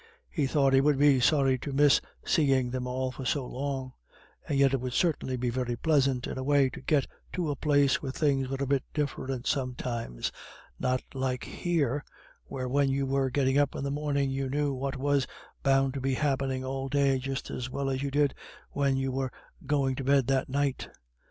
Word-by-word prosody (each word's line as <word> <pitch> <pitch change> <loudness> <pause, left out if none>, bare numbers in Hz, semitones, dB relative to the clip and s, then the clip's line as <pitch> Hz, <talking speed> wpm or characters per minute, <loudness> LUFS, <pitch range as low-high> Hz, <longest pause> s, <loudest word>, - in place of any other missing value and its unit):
He 145 -5 0
thought 135 -1 +2
he 135 - +6
would 145 0 +3
be 140 -2 +5
sorry 135 0 +3
to 145 - -5
miss 145 0 +5 0.2
seeing 135 -5 +2
them 125 0 -3
all 130 +1 -2
for 130 - -8
so 130 +2 0
long; 135 -1 -4 0.6
and 140 - +1
yet 135 -1 +4
it 135 - 0
would 125 -1 -3
certainly 140 -6 0
be 120 0 -1
very 125 -1 -2
pleasant, 135 -2 +2
in - - -4
a - - -3
way, 140 -1 +3
to - - -9
get 145 -3 +2 0.3
to 170 -5 -1
a - - -2
place 145 -1 +2
where 135 - -3
things 135 -2 +1
were 135 - -2
a - - +1
bit 135 -1 +1
different 135 -3 -2
sometimes, 125 - -2 0.5
not 130 0 0
like 130 -2 -2
here 145 -5 -1 0.4
where 130 -2 -4
when 140 +2 +2
you 135 0 0
were 135 0 +1
getting 135 +1 +2
up 145 -1 +1
in - - -4
the 140 - -2
morning 140 -2 0
you 135 0 -2
knew 145 +1 0
what 135 +1 -3
was 140 -1 +1 0.3
bound 135 -1 +3
to 135 - -4
be 135 0 0
happening 135 -2 -1
all 135 0 -3
day 140 -1 +2
just 135 0 -4
as 125 0 -4
well 140 +2 -3
as 135 -1 -1
you 140 - -1
did 145 0 +2 0.4
when 140 -1 +1
you 135 0 -1
were 130 0 -2 0.4
going 140 -2 +2
to 135 - -4
bed 135 -1 +3
that 135 +1 0
night. 140 0 -1
135 Hz, 205 wpm, -29 LUFS, 130-140 Hz, 0.6 s, he